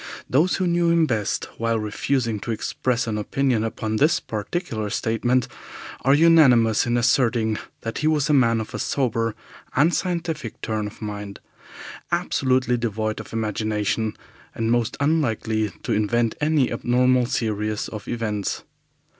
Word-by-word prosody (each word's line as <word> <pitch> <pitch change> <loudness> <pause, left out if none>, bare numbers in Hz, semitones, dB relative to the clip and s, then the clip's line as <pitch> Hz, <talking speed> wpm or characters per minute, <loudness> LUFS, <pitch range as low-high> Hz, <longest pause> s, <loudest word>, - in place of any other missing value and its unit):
Those 155 +8 +3
who 185 - 0
knew 170 -1 +2
him 170 -1 +4
best, 110 -8 -1
while 115 0 +1
refusing 115 +1 -1
to 115 - -7
express 120 +2 -1
an 110 -2 -2
opinion 125 +1 0
upon 110 -1 -2
this 150 +8 +3
particular 110 - -4
statement, 120 +4 0 0.6
are 135 +2 +5
unanimous 130 -10 +5
in 120 0 +1
asserting 115 -2 +2 0.2
that 115 - -4
he 150 - +1
was 150 -2 +2
a 150 - +2
man 115 -5 +4
of 110 - -6
a - - -4
sober 115 -4 0 0.4
and 160 +6 +4
scientific 165 - -2
turn 110 -2 -2
of 105 - -10
mind, 105 -1 -6 0.7
absolutely 130 -1 +1
devoid 110 -2 -2
of - - -9
imagination, 110 0 -1 0.4
and 115 0 0
most 120 -2 0
unlikely 115 -8 +1
to - - -1
invent 115 +2 +1
any 150 -3 +2
abnormal 125 0 +2
series 110 -2 -1
of 110 -2 -8
events. 105 -4 -2
115 Hz, 145 wpm, -23 LUFS, 110-135 Hz, 0.7 s, are